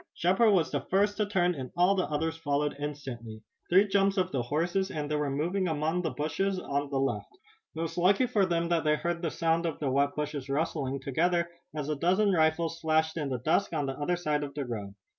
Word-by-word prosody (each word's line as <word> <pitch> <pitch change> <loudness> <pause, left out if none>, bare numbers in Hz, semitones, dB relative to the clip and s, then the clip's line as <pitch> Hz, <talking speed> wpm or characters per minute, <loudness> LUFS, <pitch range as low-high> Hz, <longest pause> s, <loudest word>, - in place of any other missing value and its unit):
Shepard 190 +6 +3
was 180 -5 +2
the - - -1
first 205 +2 +1
to 210 -1 +1
turn 180 -3 +2
and 130 -5 -6
all 180 +3 +5
the 185 -2 0
others 160 +2 -1
followed 145 -2 -1
instantly. 125 -7 -6 0.3
Three 190 +4 +5
jumps 195 0 +2
of 185 0 +1
the 130 - 0
horses 175 +9 0
and 150 -1 -4
they - - +1
were 150 -1 0
among 160 +2 0
the 165 - -1
bushes 185 +7 -1
and - - -6
trees - - -8
on 140 0 0
the 140 - -1
left. 135 - -2 0.4
It 160 - -3
was 165 +1 -3
lucky 195 +8 +4
for 210 -6 +2
them 170 -1 0
that 170 -2 +2
they 150 -1 +3
had - - -6
heard 170 0 -1
the 165 - 0
sound 165 +1 +1
of 160 - -3
the 140 -3 -1
wet 140 +2 +1
bushes 145 -2 -4
rustling 140 -2 -1
together, 170 +5 +1 0.2
as 150 -2 -3
a 150 - 0
dozen 190 +7 +2
rifles 165 0 +1
flashed 160 0 +1
in 150 -4 -2
the 130 - -1
dusk 170 - +1
on 150 -3 0
the 135 - -2
other 175 +5 0
side 150 -4 -1
of 140 -1 -7
the 145 -2 -3
road. 105 -5 -6
160 Hz, 235 wpm, -29 LUFS, 145-180 Hz, 0.4 s, all